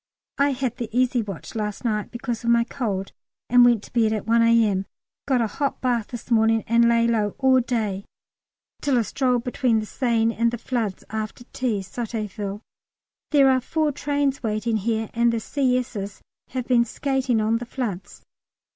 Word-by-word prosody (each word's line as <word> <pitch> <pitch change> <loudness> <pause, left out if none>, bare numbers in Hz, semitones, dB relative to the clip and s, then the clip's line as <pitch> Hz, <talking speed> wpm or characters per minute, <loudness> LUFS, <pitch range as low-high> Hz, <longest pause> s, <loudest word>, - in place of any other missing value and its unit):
I 280 0 +3
had 250 -2 -2
the 235 -3 -4
easy 250 +1 +2
watch 195 -6 -7
last 210 0 -4
night 210 -3 -1
because 240 -1 -4
of 235 - 0
my 235 0 +5
cold, 210 -7 -3 0.4
and 245 0 +7
went 240 -3 +4
to - - -14
bed 225 -2 +3
at 215 -2 -3
1 230 +1 +3
A.M.; 225 -4 +3 0.4
got 260 -3 +2
a - - +2
hot 275 +6 -2
bath 240 -4 0
this 240 0 -9
morning, 225 -1 +3
and 235 +1 +4
lay 230 0 +3
low 215 -3 0
all 265 -1 +4
day 220 -6 -2 0.8
till 280 -3 +2
a 235 - +3
stroll 250 +2 +1
between 245 -1 +1
the 215 - -4
Seine 230 -1 +1
and 235 0 +2
the 240 - -4
floods 230 -5 -3
after 220 +2 -4
tea 235 -6 -1
(Sotteville). 210 -1 -5 0.7
There 275 -3 +5
are 260 0 +2
four 310 +3 0
trains 285 -1 -1
waiting 220 0 -1
here, 220 +1 -2
and 235 0 +3
the 230 - -1
C.S.'s 250 -6 -2 0.2
have 255 -1 -4
been 245 -2 +4
skating 260 -1 0
on 220 +1 +1
the 245 - -6
floods. 225 -8 -5
235 Hz, 180 wpm, -24 LUFS, 220-255 Hz, 0.8 s, and